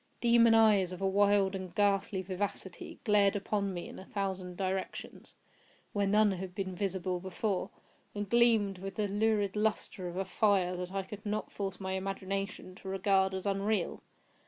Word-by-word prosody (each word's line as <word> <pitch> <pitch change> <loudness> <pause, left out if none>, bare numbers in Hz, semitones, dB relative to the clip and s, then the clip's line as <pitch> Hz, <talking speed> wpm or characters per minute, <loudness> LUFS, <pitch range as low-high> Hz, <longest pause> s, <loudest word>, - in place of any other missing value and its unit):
Demon 235 -1 +5
eyes, 210 -5 +5
of 180 - -6
a 195 - +1
wild 200 0 +3
and 185 -2 -6
ghastly 200 -2 +1
vivacity, 190 -1 -5
glared 205 -3 +4
upon 200 0 -1
me 175 -2 -5
in - - -9
a 190 - -10
thousand 190 -3 -3
directions, 190 0 -4 0.6
where 200 -1 +1
none 210 +1 +4
had 185 -1 -5
been 190 -2 -3
visible 185 -1 -2
before, 190 +1 -2 0.5
and 205 0 -3
gleamed 225 -4 +3
with 195 +1 -6
the 210 -1 0
lurid 205 -1 +1
lustre 210 -3 -1
of 175 +1 -6
a 195 - -1
fire 190 -5 +2
that 180 0 -5
I 195 0 -2
could 205 +2 -9
not 210 0 -3
force 195 -2 -4
my 190 -1 -4
imagination 195 0 -3
to 195 - -11
regard 190 0 +2
as 190 - -4
unreal. 200 -1 0
195 Hz, 170 wpm, -32 LUFS, 190-205 Hz, 0.6 s, Demon